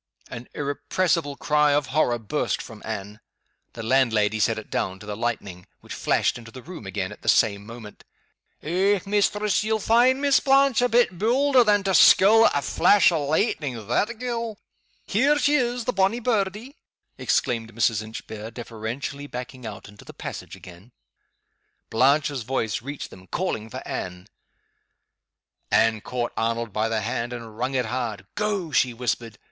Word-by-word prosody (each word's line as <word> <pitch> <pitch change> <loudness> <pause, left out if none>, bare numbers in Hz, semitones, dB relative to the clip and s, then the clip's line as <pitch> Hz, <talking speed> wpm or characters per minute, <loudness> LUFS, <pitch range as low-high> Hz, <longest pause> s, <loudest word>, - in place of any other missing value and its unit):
An 115 +1 -8
irrepressible 145 +2 -1
cry 150 0 +2
of 145 -1 +2
horror 130 -6 +2
burst 115 +6 -2
from 110 -3 -10
Anne. 105 -1 -6 0.5
The 115 - -7
landlady 110 -4 +2
set 110 +2 +2
it 110 - -9
down 95 0 -2
to 105 - -13
the 105 0 -5
lightning, 100 -6 -4
which - - -9
flashed - - 0
into 115 -1 -12
the 130 +2 -11
room 165 - -9
again 95 0 -3
at 105 - -12
the - - -1
same 100 -1 +3
moment. 115 -2 -11 0.6
"Eh, 190 +5 +2
mistress! 205 +1 +1
ye'll 220 0 +1
find 240 +5 +3
Miss 280 -1 +4
Blanche 270 -2 +3
a 245 - +2
bit 230 -7 +2
baulder 255 +4 +4
than 205 -2 +3
to 195 -1 0
skirl 220 +5 +7
at - - 0
a - - 0
flash 200 +7 +4
o' 155 -4 -1
lightning, 145 - -1
that 215 - 0
gait! 235 -2 -3 0.5
Here 275 +9 +2
she 290 0 +2
is, 245 -4 0
the 250 - -1
bonny 195 +4 +2
birdie!" 220 - -2 0.4
exclaimed 115 -2 0
Mrs. 115 -1 +1
Inchbare, 110 0 -8
deferentially 120 +5 -6
backing 125 -1 -7
out 100 -3 -9
into 105 0 -15
the - - -13
passage - - -7
again. 95 +7 -14 1.0
Blanche's 140 +3 +2
voice 115 -2 -2
reached 140 +3 -7
them, 95 0 -14
calling 115 - -3
for - - -7
Anne. 90 0 -5 1.4
Anne 110 -1 +3
caught 120 0 -3
Arnold 115 -1 -2
by 110 +1 0
the 110 -1 -1
hand 115 +2 -3
and 115 -3 -8
wrung 125 +4 -2
it 125 -2 +1
hard. 115 -2 -4
"Go!" 205 -6 -2
she 125 -3 +2
whispered. 115 -2 -3
130 Hz, 165 wpm, -24 LUFS, -, 1.4 s, skirl